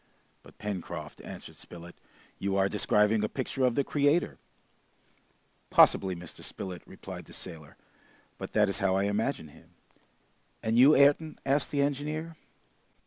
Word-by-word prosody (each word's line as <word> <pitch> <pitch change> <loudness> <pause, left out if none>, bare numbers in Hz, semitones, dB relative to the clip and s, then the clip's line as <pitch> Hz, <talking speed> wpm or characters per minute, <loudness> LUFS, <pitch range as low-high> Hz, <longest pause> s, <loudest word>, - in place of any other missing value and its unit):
"But, - - -18
Pencroft," 90 -6 -6
answered - - -10
Spilett, 85 0 -11 0.4
"you 100 0 -1
are 95 0 +3
describing 105 +1 +2
a 105 - 0
picture 130 0 -3
of 125 -2 +2
the 140 - +2
Creator." 145 +4 +1 1.3
"Possibly, 95 -2 +5
Mr. 85 -1 -10
Spilett," 90 -2 -5
replied - - -9
the - - -14
sailor, 80 -5 -9 0.6
"but - - -7
that 105 -1 +4
is 100 - -1
how 95 -2 +2
I 95 - +2
imagine 105 - -1
him!" - - -20 0.9
"And 110 +2 +2
you, 140 +4 +8
Ayrton?" 145 +3 +4
asked 140 +1 +1
the 140 -1 +1
engineer. 150 +3 -3
105 Hz, 140 wpm, -29 LUFS, 95-140 Hz, 1.3 s, you